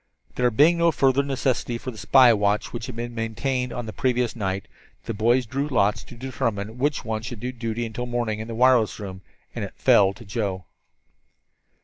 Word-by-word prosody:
There 125 0 +2
being 155 +9 +4
no 170 0 +4
further 135 -2 +3
necessity 130 -3 -1
for 130 - -6
the 110 - -13
spy 125 +2 +6
watch 105 0 0
which 120 0 -5
had 125 - -7
been 120 +1 -5
maintained 125 +3 -2
on 120 - -4
the 110 - -7
previous 125 -2 0
night, 95 -3 -3 0.4
the - - -3
boys 120 +5 +2
drew 135 +5 -2
lots 105 -7 +1
to - - -12
determine 115 -3 -3
which 145 +2 0
one 110 -1 -2
should 115 0 -7
do 125 +3 -3
duty 115 -1 -3
until 120 +2 -5
morning 120 -3 -2
in 110 - -5
the 115 - -5
wireless 125 -2 +4
room, 95 -2 -7 0.3
and - - -4
it - - -7
fell 95 -1 +5
to 120 - -13
Joe. 100 -5 -3
120 Hz, 200 wpm, -24 LUFS, 110-130 Hz, 0.4 s, spy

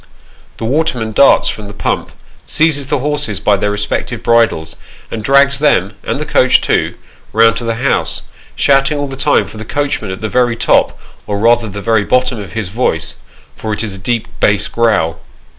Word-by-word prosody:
The - - -4
waterman 125 -4 -1
darts 140 +6 +4
from 105 -1 -3
the 100 - -10
pump, - - -2 0.4
seizes 155 -4 +2
the - - 0
horses 145 -7 -2
by 105 0 +2
their 105 +1 -1
respective 105 +3 -2
bridles, 110 -9 +1 0.4
and 110 -2 -5
drags 140 +2 +4
them, - - +2
and - - -2
the - - -3
coach - - +4
too, - - 0 0.4
round 115 +1 +4
to 120 - -5
the 115 0 -1
house, 130 +4 -1 0.3
shouting 135 +1 +2
all 145 - -1
the 135 -1 -7
time 145 +2 +2
for - - -11
the 110 - -6
coachman 145 0 -2
at 95 - -6
the 110 - -2
very 120 +1 +1
top, - - +2 0.3
or 105 - -2
rather 115 +2 +3
very 105 +2 0
bottom 125 +1 +1
of 100 - -8
his 110 -5 -3
voice, 100 -6 -1 0.4
for 110 -1 -4
it 105 - -3
is 105 -3 -4
a 95 - -8
deep 115 +2 -2
bass 100 -1 +2
growl. 110 -8 0
115 Hz, 190 wpm, -14 LUFS, 105-135 Hz, 0.4 s, darts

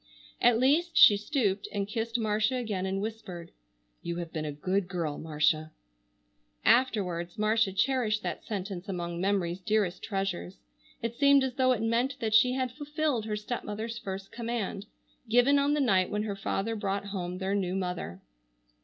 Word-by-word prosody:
At 240 -2 +5
least 305 +8 +2
she 205 - +9
stooped 210 -3 -1
and 200 -1 -2
kissed 225 +2 -2
Marcia 215 +2 +1
again 210 -7 -2
and 195 +1 -2
whispered: 195 -6 -6 0.5
"You 170 - -4
have 170 -1 -6
been 155 -1 -3
a 150 - -3
good 185 +6 -1
girl, 170 -5 -3
Marcia." 155 0 0 0.9
Afterwards, 185 -8 +2
Marcia 215 -1 +2
cherished 215 +1 +1
that - - -4
sentence 195 -3 -5
among 175 -2 -3
memory's 190 -3 0
dearest 205 -2 0
treasures. 195 -2 -3 0.5
It 230 0 -1
seemed 280 -1 +5
as 260 -1 -1
though 255 0 +3
it 230 -3 0
meant 240 +4 +1
that 220 -2 -1
she 250 +3 +5
had 255 -1 -1
fulfilled 295 -3 -2
her 215 -1 -2
stepmother's 220 +1 -4
first 195 -1 -6
command, 225 -4 -4 0.4
given 245 +5 +5
on 285 +1 +2
the - - 0
night 195 -9 +3
when 210 0 -1
her 205 -2 -3
father 195 +3 -2
brought 200 -1 -2
home 180 -2 -4
their 190 +1 -2
new 190 -2 0
mother. 180 - -4
210 Hz, 165 wpm, -29 LUFS, 185-235 Hz, 0.9 s, she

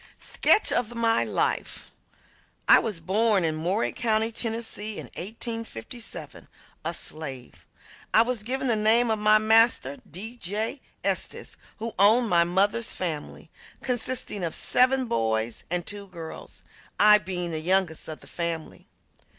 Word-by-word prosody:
SKETCH 430 - +3
OF 240 0 +1
MY 230 -1 +2
LIFE - - -2 0.8
I - - +8
was 210 -7 -3
born 200 +3 +2
in 160 -1 0
Murray 180 +8 0
County, 225 -2 0
Tennessee, 225 -2 -3
in - - -6
1857, 225 - -7 0.4
a - - -1
slave. 135 -5 -7 0.4
I 225 - +6
was 240 -2 -2
given 260 +5 -2
the 240 -3 +2
name 225 +2 +3
of 220 - 0
my 215 0 +5
master, 220 - +4
D. 220 +9 -8
J. 220 +7 -3 0.2
Estes, - - -2 0.2
who 225 +1 -5
owned 220 +4 +5
my 170 -1 +5
mother's 200 +6 +1
family, 160 -5 -5 0.3
consisting 245 -5 -1
of 165 - -1
seven 255 +1 +3
boys 110 - -1
and 175 0 -1
two 205 -1 -6
girls, 165 -3 -10 0.4
I 210 0 +7
being 180 -2 -4
the 160 -1 -3
youngest 180 -1 +1
of 155 -1 -7
the - - -13
family. 170 -2 -4
210 Hz, 140 wpm, -26 LUFS, 170-230 Hz, 0.8 s, I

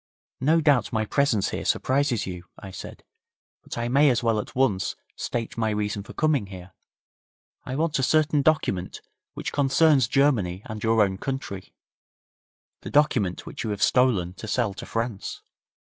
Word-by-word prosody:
'No 160 +5 +3
doubt 145 -6 +3
my 110 -2 0
presence 120 -4 +1
here - - -4
surprises 130 -3 +1
you,' 90 -2 -7
I 95 -2 -9
said, 95 - -9 0.6
'but - - -8
I 120 0 -1
may 140 +4 +4
as 125 -2 +1
well 115 -2 +2
at - - -7
once 115 -8 +1 0.2
state 115 -1 -4
my 110 -1 +1
reason 105 -1 -2
for 100 - -11
coming 150 -9 +1
here. 95 -1 -11 0.9
I 130 - -3
want 155 -1 0
a - - +2
certain 150 +2 +3
document 120 - 0 0.3
which - - -5
concerns 140 -2 +4
Germany 110 -10 +1
and 110 -1 -7
your 115 -1 +4
own 95 -1 -2
country 130 -9 -5 1.1
the - - -7
document 125 -11 +1
which - - -6
you 110 - -3
have 105 +1 -1
stolen 110 -10 +3
to 110 - -7
sell 110 -2 0
to - - -9
France.' 115 -3 -4
115 Hz, 165 wpm, -25 LUFS, 100-140 Hz, 1.1 s, may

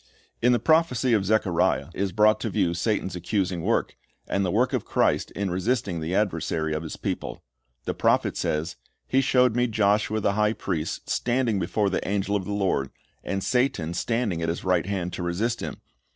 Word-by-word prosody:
In 125 - +4
the 120 - +4
prophecy 130 -2 +2
of 100 -3 +2
Zechariah 100 -4 +1
is 100 -1 -1
brought 110 +3 +4
to 110 - -2
view 85 -3 +1
Satan's 95 0 -1
accusing 90 0 -1
work, - - 0 0.3
and 100 - 0
the 95 - 0
work 120 +7 +1
of - - 0
Christ - - +1
in 100 -2 -2
resisting 95 -1 -1
the 80 +3 -2
adversary 80 -6 0
of 80 - -2
His 80 - -6
people. - - -4 0.4
The - - -1
prophet - - +2
says, 80 +3 -2 0.3
"He 135 - +3
showed 125 -3 +3
me 125 0 +2
Joshua 105 0 +1
the 100 -1 +1
high 105 +1 +2
priest 80 -7 -3
standing 120 -4 0
before 100 +3 0
the - - -2
angel 100 +1 0
of 95 -2 -1
the 105 - -4
Lord, 95 -10 0 0.3
and 95 -1 -2
Satan 125 -11 0
standing 110 -3 -1
at 80 - -1
his 85 - -3
right 90 -1 +1
hand 90 -3 -2
to - - -4
resist 105 +7 -1
him. - - -5
100 Hz, 190 wpm, -25 LUFS, 90-115 Hz, 0.4 s, In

